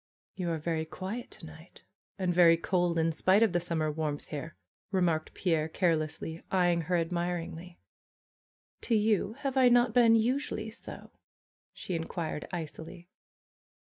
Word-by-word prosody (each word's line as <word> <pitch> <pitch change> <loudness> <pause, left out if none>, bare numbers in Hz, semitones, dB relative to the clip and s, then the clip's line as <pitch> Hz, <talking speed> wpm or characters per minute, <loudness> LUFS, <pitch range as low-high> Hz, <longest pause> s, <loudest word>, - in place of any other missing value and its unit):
'^You 180 -2 -3
are 165 -1 0
very 160 0 -2
quiet 190 +8 -6
to - - -9
night, 160 +2 -14 0.3
and 185 -2 0
very 170 -1 +6
cold 175 0 0
in 165 0 +2
spite 190 +6 +4
of 215 -5 +2
the 175 - +3
summer 165 -3 -1
warmth 150 -1 -3
here," 155 +2 -6 0.3
remarked 175 -5 0
Pierre 160 -4 0
care 170 0 +2
lessly, 155 +1 -5
eyeing 175 -2 +2
her 175 +3 -1
admiringly. 175 0 -3 1.0
^^To 225 -3 +2
you 210 -1 +1
have 275 -2 -2
I 255 -1 +6
not 240 -1 +4
been 230 -2 +6
usually 225 -1 0
so?" 230 - -10 0.6
she 185 - -6
inquired, 165 -2 -4
icily. 170 +1 -7
175 Hz, 145 wpm, -30 LUFS, 160-195 Hz, 1.0 s, very